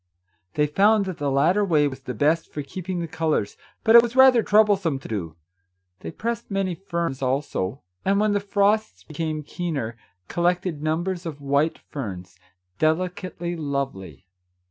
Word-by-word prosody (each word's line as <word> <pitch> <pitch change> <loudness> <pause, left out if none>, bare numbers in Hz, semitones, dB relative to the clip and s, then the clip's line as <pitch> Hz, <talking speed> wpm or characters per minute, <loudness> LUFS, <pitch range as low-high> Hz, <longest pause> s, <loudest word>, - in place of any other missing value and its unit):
They 150 - +3
found 200 +7 +3
that 185 -3 -5
the 145 -1 0
latter 160 +10 +3
way 155 -6 +3
was 130 -1 -6
the 130 -2 -6
best 155 +8 +1
for 145 - -4
keeping 180 +4 -5
the 170 - -3
colours, 155 -9 -1 0.3
but 225 - +5
it 235 - +12
was 235 +1 -4
rather 260 -2 +7
troublesome 200 -8 +3
to 135 - -10
do. 85 -8 -4 0.6
They 80 - -7
pressed 230 - -4
many 195 -2 -1
ferns, 170 -6 -3
also, 130 -4 -2 0.2
and, 200 +1 +2
when 210 0 +2
the 205 - +2
frosts 200 - +1
became 155 - -4
keener, 145 -8 -4 0.3
collected 175 -2 0
numbers 170 +3 -2
of 150 -3 -6
white 140 +3 +1
ferns, 95 -10 -8 0.4
deli 160 +4 +2
cately 175 -1 -6
lovely. 135 - -4
165 Hz, 160 wpm, -24 LUFS, 140-195 Hz, 0.6 s, it